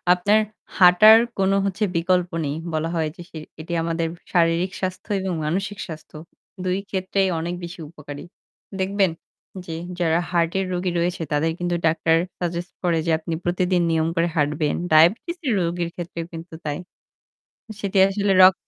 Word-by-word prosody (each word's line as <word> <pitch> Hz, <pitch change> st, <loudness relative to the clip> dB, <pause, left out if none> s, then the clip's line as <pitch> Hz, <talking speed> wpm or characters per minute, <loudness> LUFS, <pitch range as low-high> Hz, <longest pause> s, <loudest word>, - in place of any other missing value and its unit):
আপনার 205 Hz, +4 st, +3 dB, 0.4 s
হাঁটার 190 Hz, +5 st, +8 dB, 0.2 s
কোন 195 Hz, 0 st, +2 dB
হচ্ছে 200 Hz, +2 st, -1 dB
বিকল্প 180 Hz, +1 st, +2 dB, 0.2 s
নেই। 145 Hz, +1 st, -2 dB, 0.2 s
বলা 160 Hz, +1 st, -1 dB
হয় 160 Hz, -1 st, 0 dB
যে 175 Hz, -, -11 dB
সে 160 Hz, -, -8 dB, 0.2 s
এটি 170 Hz, +2 st, -6 dB
আমাদের 165 Hz, 0 st, -1 dB, 0.3 s
শারীরিক 170 Hz, +1 st, +2 dB
স্বাস্থ্য 185 Hz, +3 st, -4 dB
এবং 190 Hz, -1 st, -2 dB
মানসিক 195 Hz, +5 st, -2 dB
স্বাস্থ্য 160 Hz, -1 st, -10 dB, 0.5 s
দুই 185 Hz, +1 st, 0 dB
ক্ষেত্রেই 190 Hz, 0 st, 0 dB
অনেক 170 Hz, +2 st, -3 dB
বেশি 170 Hz, 0 st, -7 dB
উপকারী। 145 Hz, -3 st, -9 dB, 0.6 s
দেখবেন 195 Hz, -1 st, +1 dB, 0.5 s
যে 165 Hz, -, -6 dB, 0.3 s
যারা 165 Hz, -1 st, +2 dB
হার্টের 175 Hz, +2 st, +1 dB
রোগী 180 Hz, 0 st, -1 dB
রয়েছে 175 Hz, 0 st, -1 dB
তাদের 155 Hz, +2 st, +1 dB
কিন্তু 175 Hz, 0 st, -1 dB
ডাক্তার 160 Hz, 0 st, +2 dB, 0.2 s
সাজেস্ট 175 Hz, +1 st, -3 dB
করে 170 Hz, -2 st, +2 dB
যে 165 Hz, -, +1 dB
আপনি 165 Hz, +1 st, -5 dB
প্রতিদিন 180 Hz, 0 st, +1 dB
নিয়ম 160 Hz, 0 st, +1 dB
করে 165 Hz, +1 st, +2 dB
হাঁটবেন। 150 Hz, 0 st, +1 dB, 0.2 s
ডায়াবেটিসের 235 Hz, -, +3 dB
রোগীর 170 Hz, 0 st, -1 dB
ক্ষেত্রেও 170 Hz, -1 st, -5 dB
কিন্তু 165 Hz, +1 st, -9 dB
তাই। 145 Hz, -1 st, -2 dB, 1.0 s
সেটি 200 Hz, -1 st, -1 dB
আসলে 200 Hz, 0 st, 0 dB
রক 185 Hz, -, +8 dB
175 Hz, 150 wpm, -23 LUFS, 165-190 Hz, 1.0 s, হাঁটার